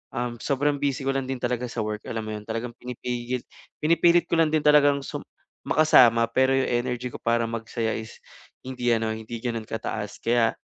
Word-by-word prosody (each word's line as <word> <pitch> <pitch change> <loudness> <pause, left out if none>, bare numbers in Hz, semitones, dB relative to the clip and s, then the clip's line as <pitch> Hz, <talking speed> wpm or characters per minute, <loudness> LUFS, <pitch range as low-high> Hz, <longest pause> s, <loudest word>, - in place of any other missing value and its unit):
um, 120 -1 -3
sobrang 145 +2 0
busy 140 0 -1
ko 135 - +1
lang 135 -1 -2
din 130 -1 -3
talaga 125 0 -1
sa 115 -2 -3
work, 105 0 -4
alam 115 -1 -3
mo 110 - -5
yun. 105 - -7
Talagang 115 +2 -3
pinipigil 125 0 -4 0.4
pinipilit 170 +2 +4
ko 170 - +3
lang 165 - +5
din 155 -1 +1
talagang 145 -2 +5
sum - - -6 0.4
makasama 120 -6 +6
pero 130 0 +3
yung 135 - +1
energy 125 0 -1
ko - - -8
para 115 0 +1
magsaya 115 0 -2
is 110 - -9 0.5
hindi 125 -2 -1
ano, 110 -1 -1
hindi 110 +1 -6
ganon 115 -3 -3
kataas. 105 -2 -5
Kaya, 115 -1 +2
120 Hz, 190 wpm, -25 LUFS, 115-135 Hz, 0.5 s, makasama